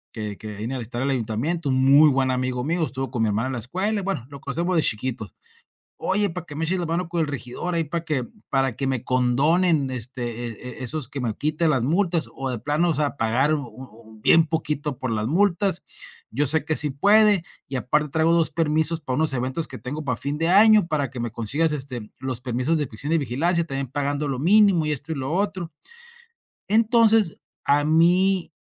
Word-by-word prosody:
que 105 -3 -5
que 105 -1 -8
viene 115 +6 -4
a - - -3
visitar 120 0 -5
al 135 - 0
ayuntamiento, 135 +6 -1
muy 135 +4 +5
buen 135 -1 +1
amigo 125 -1 -1
mío. 165 +4 -1
Estuvo 135 -3 -4
con 120 -2 -1
mi 110 - +1
hermana 110 +5 -1
en 130 - -4
la - - -3
escuela. 190 - -2
Bueno, 190 -11 -3
lo 140 -1 -10
conocemos 170 +7 -2
de 160 - +3
chiquito. 115 -1 -3 0.7
"Oye, 200 0 0
para 175 0 -7
que 150 - -9
me 160 +2 -2
eches 185 +3 0
la 175 - -2
mano 170 +2 -2
con 170 0 -2
el - - -1
regidor 145 +5 -4
ahí 165 - +1
para 165 +2 -4
que 145 -7 -1 0.2
para 135 -3 0
que 135 - -2
me 130 -3 -1
condonen, 140 +5 +2
este, 120 -1 -4
e 120 +2 -7
e - - -4
esos 145 0 -1
que 140 0 -6
me 115 -4 -2
quite 155 +2 -1
las 135 -6 +2
multas, 170 +4 0
o 135 -1 -4
de 120 -3 -4
plano, 150 +7 +1
o - - 0
sea, 145 -1 -1
pagar 125 +5 +1
u 145 -4 -4
u 110 -2 -14
bien 165 0 +5
poquito 150 -2 -3
por 130 - -3
las 110 -1 -1
multas. 185 - +1 0.5
Yo 145 - 0
sé 155 +2 +5
que 155 0 0
sí 150 - +6
puede, 205 +6 +4 0.3
y 135 - -7
aparte 150 +4 0
traigo 160 +3 +2
2 165 -3 +3
permisos 160 +1 +2
para 130 -4 -3
unos 155 -1 +2
eventos 130 +5 -2
que - - -9
tengo 150 +4 -6
para 125 -4 -1
fin 140 +4 -3
de 165 +1 0
año 210 0 +6
para 145 -6 -1
que 130 - -9
me 120 -2 -4
consigas, 145 +8 -1
este, 130 -7 -4
los 130 -2 -3
permisos 130 +6 -1
de 150 - -1
prisión 140 +7 -5
y 165 - +3
vigilancia 165 +7 0
también 135 -3 -4
pagando 145 +2 -2
lo 135 -2 -3
mínimo, 185 +1 +4
y 150 - 0
esto, 150 +3 -5
y - - -3
lo 135 +2 -4
otro". 190 -3 -2 1.0
Entonces, 220 -3 +3 0.3
a 145 +1 +3
mí 175 +3 +2
145 Hz, 220 wpm, -23 LUFS, 125-165 Hz, 1.0 s, sí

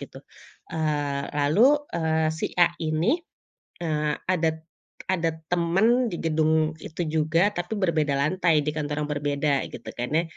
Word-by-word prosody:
gitu. - - -10 0.5
Eee, 145 -3 -1
lalu, 195 - +4 0.2
eee, 160 -1 +1
si 160 - -2
A 175 -1 +5
ini, 160 - +1 0.6
eee, 150 -2 0
ada 170 -3 +2
t - - -20 0.5
ada 170 -3 +1 0.2
teman 195 +8 +3
di 170 - -5
gedung 155 -1 +1
itu 165 +2 -4
juga, 160 +6 +2
tapi 175 +5 -3
berbeda 155 -7 +1
lantai, 155 0 +2
di 150 - 0
kantor 150 -1 -2
yang 150 - -9
berbeda, 145 0 0 0.2
gitu 115 - -10
kan, 120 +1 -4
ya. 165 - +2
160 Hz, 150 wpm, -25 LUFS, 150-175 Hz, 0.6 s, A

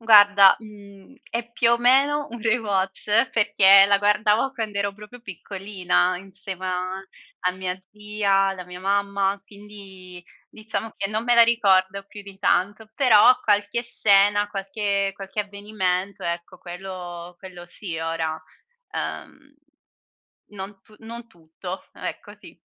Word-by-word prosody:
Guarda, 205 -3 +7
mhmm, 205 +1 -15 0.2
è 235 0 -5
più 235 0 +2
o 235 - +3
meno 275 +4 +3
un 240 0 -8
rewatch 215 0 0
perché 200 -3 +5
la 200 0 +3
guardavo 210 +4 +2
quando 220 -5 -4
ero 200 0 -1
proprio 210 +4 -13
piccolina 190 -2 -2
insieme 190 -1 -8
a 185 +1 -3 0.4
a 180 - +3
mia 185 0 -5
zia, 210 -1 -4 0.2
alla 190 -2 -5
mia 180 0 -10
mamma, 200 +1 -1
quindi 195 -3 -13 0.2
diciamo 220 0 -6
che 195 +1 -4
non 215 +1 -2
me 245 0 +3
la 235 - +8
ricordo 200 -4 +2
più 205 0 -11
di 200 -1 -13
tanto, 205 +4 0
però 250 -2 +6
qualche 205 +2 0
scena, 205 -2 +3
qualche 200 0 -2
qualche 195 +2 -5
avvenimento, 200 -2 -3
ecco 170 0 -5
quello 175 -1 -9
quello 180 -2 -11
sì 175 -2 -7
ora, 160 -1 -3 0.5
ehm 280 +1 -7 1.0
non 195 0 -9
tu 215 - -21
non 235 +1 -9
tutto, 180 0 -10
ecco - - -8
sì. - - -16
200 Hz, 135 wpm, -23 LUFS, 190-215 Hz, 1.0 s, la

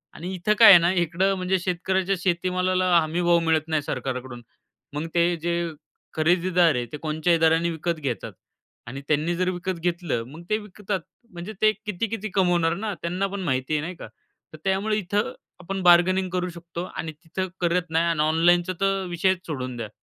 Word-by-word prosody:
आणि 180 +4 -6
इथे 190 +4 +1
काय 225 - +10
आहे 195 - +11
ना 170 +1 +2
इकडे 180 +2 +1
म्हणजे 185 +1 0
शेतकऱ्याच्या 190 +2 0
शेतीमालाला 185 +1 0
हमी 165 +2 -1
भाव 170 0 +4
मिळत 160 -1 +2
नाही 155 -2 0
सरकारकडून. 130 -3 -4 0.5
मग 150 +2 -3
ते 170 0 +3
जे 170 0 -1 0.4
खरेदीदार 175 0 +3
आहे, 120 -1 -1
ते 120 - -8
कोणच्याही 160 +3 0
दराने 165 +1 +3
विकत 165 0 -3
घेतात 135 -6 -4 0.5
आणि 135 +4 -6
त्यांनी 155 +3 +1
जर 185 +1 0
विकत 180 -1 -3
घेतलं 170 -8 -1
मग 155 +6 -11
ते 215 - +2
विकतात 205 -1 -5 0.3
म्हणजे 175 +5 -7
ते 215 0 +6
किती-किती 215 +1 -3
कमवणार 175 -3 +2
ना, 210 +2 -3
त्यांना 180 +3 -1
पण 200 0 -5
माहिती 130 -1 -1
आहे 150 - +1
नाही 170 +4 -5
का - - -9 0.5
तर - - -9
त्यामुळे 195 +3 0
इथे 205 0 -2 0.4
आपण 190 +2 -4
बार्गेनिंग 180 +2 +5
करू 180 0 -1
शकतो 170 0 -7
आणि 160 - -4
तिथे 185 +3 -3
करत 175 +1 +1
नाही 165 +1 +2
आणि 165 -3 +1
ऑनलाईनचा 175 +3 +3
तर 195 -1 +1
विषयच 185 +1 0
सोडून 130 -5 -4
द्या. 115 -3 -5
175 Hz, 180 wpm, -24 LUFS, 160-185 Hz, 0.5 s, आहे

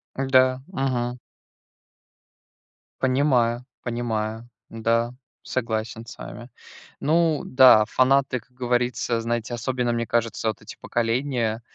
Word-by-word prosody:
Да, 130 -1 +3
мгм. 125 -7 -2 1.8
Понимаю 130 -3 +2 0.2
понимаю, 115 -1 -3 0.2
да, 115 +1 0 0.3
согласен 115 -2 -3
с 120 - -11
вами. 120 +1 -9 0.5
Ну 160 0 +2
да, 130 -5 +7
фанаты, 130 +2 +2
как 125 - -31
говорится, 125 -1 -1
знаете, 115 0 -2
особенно, 120 0 -1
мне 115 0 -1
кажется, 115 -1 -1
вот 110 - -5
эти 110 - -10
поколения 120 -1 -1
120 Hz, 100 wpm, -24 LUFS, 115-130 Hz, 1.8 s, да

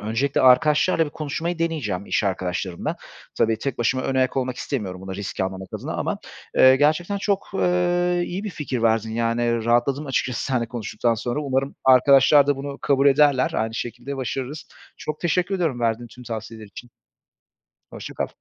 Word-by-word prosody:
öncelikle 115 +7 0
arkadaşlarla 150 +6 +4
bir 150 - -7
konuşmayı 160 +4 -4
deneyeceğim, 130 - -2
iş - - 0
arkadaşlarımla 90 -1 -2 0.4
tabii, 110 -1 +1
tek 135 +1 -4
başıma 130 +2 +1
önayak 130 0 0
olmak 130 -1 -1
istemiyorum 100 -10 -4
bunu 95 0 -7
risk 100 0 -5
almamak 95 0 -3
adına - - -5
ama, - - -2 0.4
eee, 130 0 +7
gerçekten 155 +8 +1
çok, 200 0 -1
eee, 175 -1 +1
iyi 185 +4 -5
bir 210 - -3
fikir 140 -8 -4
verdin, 110 -1 +2
yani, 115 0 0
rahatladım 125 +5 +1
açıkçası 125 -2 -1
seninle 125 -4 0
konuştuktan 115 0 -1
sonra. 120 +5 -3
Umarım 135 -1 -1
arkadaşlar 135 +2 +6
da 145 - +2
bunu 140 0 -6
kabul 140 0 +2
ederler, 140 -2 +4
aynı 110 0 -1
şekilde 125 +5 -5
başarırız. 135 +3 -4 0.3
Çok 155 0 -6
teşekkür 180 +3 0
ediyorum, 160 -10 -1
verdiğin 115 0 -1
tüm 125 +3 -14
tavsiyeler 110 -1 -7
için. 120 +4 -12 1.0
Hoşça - - -8
kal. - - -2
130 Hz, 165 wpm, -23 LUFS, 115-150 Hz, 1.0 s, eee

